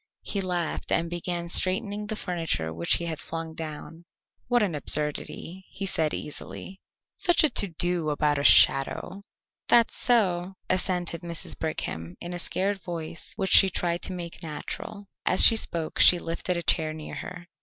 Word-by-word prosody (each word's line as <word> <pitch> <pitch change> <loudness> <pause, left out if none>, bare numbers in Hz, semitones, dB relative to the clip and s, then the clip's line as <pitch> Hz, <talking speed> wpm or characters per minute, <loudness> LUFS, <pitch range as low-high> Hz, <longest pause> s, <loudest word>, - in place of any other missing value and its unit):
He 200 - -2
laughed 180 -3 -3
and 165 0 +1
began 175 0 -4
straightening 200 +4 +1
the 220 - -3
furniture 165 - -2
which 85 +1 +1
he 170 - -3
had 160 -2 -4
flung 165 -1 -6
down. 160 +1 -8 0.4
"What 245 -2 +2
an 190 -5 -1
absurdity," 150 +5 -1
he 200 - -6
said 160 -5 +1
easily. 190 +5 -7 0.3
"Such 350 -2 +3
a 310 - +3
to 200 - +5
do 175 -1 0
about 150 -1 0
a - - -2
shadow." 145 +9 +4 0.5
"That's 235 -1 +4
so," 190 -6 +1 0.2
assented 180 -2 -2
Mrs. 170 -2 -5
Brigham, 85 - -5
in 175 +1 -7
a 175 - -4
scared 195 +3 -1
voice 170 -2 -6
which 195 -2 -2
she 195 - +8
tried 175 -1 -2
to - - -5
make 175 -2 -7
natural. 180 +5 -7 0.2
As 185 - +6
she 225 - +8
spoke 165 -7 -1
she 180 - +8
lifted 170 +1 -3
a 170 - -4
chair 155 -1 +1
near 155 -1 -9
her. 175 -1 -8
175 Hz, 165 wpm, -26 LUFS, 160-190 Hz, 0.5 s, she